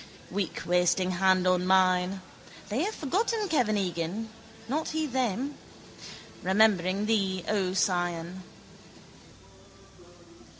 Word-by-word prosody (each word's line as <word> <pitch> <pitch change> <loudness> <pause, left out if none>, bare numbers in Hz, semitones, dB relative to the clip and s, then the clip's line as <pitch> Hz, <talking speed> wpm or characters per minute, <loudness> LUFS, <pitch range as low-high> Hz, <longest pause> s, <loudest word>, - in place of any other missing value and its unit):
Weak 190 -1 -3
wasting 180 +1 +2
hand 185 0 +3
on 180 0 +2
mine. 185 0 +3 0.5
They 215 +5 -1
have 430 - -3
forgotten 415 - -1
Kevin 240 -9 +2
Egan, 185 +4 -3 0.4
not 300 +6 -1
he 315 0 -1
them. 260 0 -2 0.8
Remembering 190 0 +2
thee, 195 -5 0
O 190 -3 0
Sion. 175 -2 -1
190 Hz, 95 wpm, -28 LUFS, 180-225 Hz, 0.8 s, hand